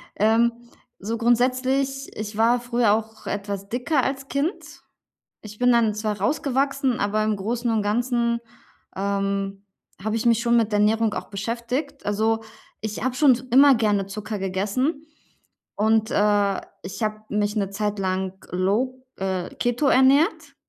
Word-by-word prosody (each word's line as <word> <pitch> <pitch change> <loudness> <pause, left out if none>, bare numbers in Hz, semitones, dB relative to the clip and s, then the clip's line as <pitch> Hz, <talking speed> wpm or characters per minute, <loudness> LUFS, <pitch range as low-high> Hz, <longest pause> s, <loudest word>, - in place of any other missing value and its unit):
ähm, 225 +3 +3 0.5
so 225 +4 -3
grundsätzlich 255 +3 +1
ich 210 0 -5
war 235 +2 +4
früher 240 -3 +2
auch 220 0 -4
etwas 200 -1 -4
dicker 255 +4 0
als 270 0 -3
Kind. 290 +9 -2 0.8
Ich 210 -1 -11
bin 250 0 +4
dann 230 -3 +3
zwar 210 -1 -2
rausgewachsen, 275 - 0
aber 210 +1 +1
im 215 0 +1
Großen 235 +5 -2
und 220 -1 +1
Ganzen, 235 +2 0 0.6
ähm, 195 0 -2 0.4
habe 215 +1 -1
ich 225 - -2
mich 230 -1 +4
schon 235 0 +3
mit 220 -2 +1
Ernährung 215 +1 +2
auch - - -5
beschäftigt. 235 +8 -4
Also, 220 +2 0 0.4
ich 215 0 -4
habe 255 0 -1
schon 270 -2 +5 0.2
immer 275 +2 +7
gerne 210 -4 +1
Zucker 210 +1 -5
gegessen 210 - -1 0.7
und, 220 +1 +2
äh, 205 -1 +2 0.2
ich 185 +5 -7
habe 215 0 -1
mich 210 +1 -1
'ne 200 -2 0
Zeit 210 +1 -2
lang 190 -1 -1 0.2
low, 230 +8 -1
äh, 190 -2 -3
keto 245 +4 0
ernährt, 270 +5 +3
220 Hz, 145 wpm, -23 LUFS, 205-250 Hz, 0.8 s, immer